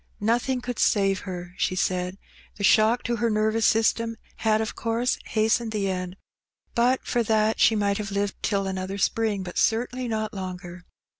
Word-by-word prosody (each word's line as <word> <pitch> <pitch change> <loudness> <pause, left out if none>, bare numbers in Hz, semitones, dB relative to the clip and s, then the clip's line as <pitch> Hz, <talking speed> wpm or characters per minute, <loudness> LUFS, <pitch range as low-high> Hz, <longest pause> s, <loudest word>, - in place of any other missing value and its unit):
Nothing 240 +4 0
could 245 -2 -5
save 195 -2 +2
her, 180 -1 -6
she 185 - 0
said. 185 0 -1 0.4
The 205 - -6
shock 220 +4 +4
to 235 0 -1
her 235 0 +1
nervous 215 +1 +2
system 230 +1 +2 0.2
had 215 -1 +2
of 220 - -3
course 230 +2 -1
hastened 220 +1 +1
the 200 -2 0
end; 180 0 -4 0.6
but 245 +2 +2
for 240 - +1
that 220 0 +1
she 225 - +5
might 200 -1 +1
have 205 -1 -4
lived 200 0 -2
till 200 -2 0
another 190 0 -3
spring, 210 -1 0
but 180 -1 -4
certainly 245 +3 0
not 220 -1 -2
longer. 180 -2 -7
215 Hz, 170 wpm, -25 LUFS, 195-230 Hz, 0.6 s, she